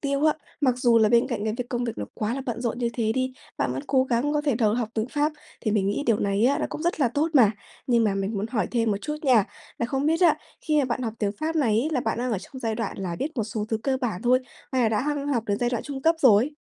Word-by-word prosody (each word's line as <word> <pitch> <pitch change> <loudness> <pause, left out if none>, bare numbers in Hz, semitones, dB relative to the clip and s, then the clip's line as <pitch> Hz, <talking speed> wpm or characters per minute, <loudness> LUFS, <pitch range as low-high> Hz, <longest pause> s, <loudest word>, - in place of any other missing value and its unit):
tiêu 280 +1 0
á, 305 - +5 0.3
mặc 255 -4 +3
dù 240 -3 +4
là 220 - +4
bên 235 +1 +4
cạnh 220 -5 -2
cái 215 0 -1
việc 250 -1 -4
công 245 -1 -2
việc 230 - -4
nó 105 - -2
quá 215 +3 -2
là 270 - -3
bận 235 -1 -3
rộn 240 0 -2
như 240 -1 0
thế 220 -2 0
đi, 255 +1 -1 0.3
bạn 130 -1 0
vẫn 130 +2 -4
cố 260 -1 +3
gắng 265 +4 0
có 295 - +1
thể 290 -5 +1
đầu 220 -2 +2
học 235 -3 -1
tiếng 220 +2 -1
Pháp, 295 +2 0 0.3
thì 215 - -1
mình 200 -2 +1
nghĩ 205 - -1
điều 225 -3 +3
này 200 +2 +1
á, 280 - +2
nó - - -1
cũng 305 - -6
rất 345 -2 0
là 260 - +4
tốt 290 +7 0
mà. 230 -7 +7 0.4
Nhưng 235 -3 +3
mà 200 - +1
mình 195 +2 -2
muốn 200 +2 -2
hỏi 230 -2 -1
thêm 230 -2 +1
một 200 - 0
chút 300 0 -3
nha, 250 -8 +5 0.3
là 235 - 0
không 270 +3 -1
biết 325 +3 +2
á, 350 - +5 0.2
khi 305 -2 +1
mà 280 - +3
bạn 255 +1 -2
học 225 -3 -2
tiếng 205 -2 0
Pháp 320 +1 -1
này 225 -7 +3
ấy, 295 - -1
là 260 - +1
bạn 225 0 -1
đang 245 -1 -1
ở 200 - 0
trong 260 +7 -11
giai 225 -1 -1
đoạn 215 -4 -4
là 180 -3 -3
biết 300 - -4
một 225 - 0
số 215 0 -3
thứ 220 - 0
cơ 270 -1 +1
bản 225 -7 -2
thôi, 250 +1 +4 0.3
hay 255 -2 +2
là 225 - +4
đã 215 -1 +1
hăng 290 0 -2
học 240 -6 0
đến 205 0 0
giai 240 0 0
đoạn 240 - -2
trung 275 -2 -6
cấp 330 +2 +4
rồi? 245 0 +5
240 Hz, 315 wpm, -25 LUFS, 220-275 Hz, 0.4 s, mà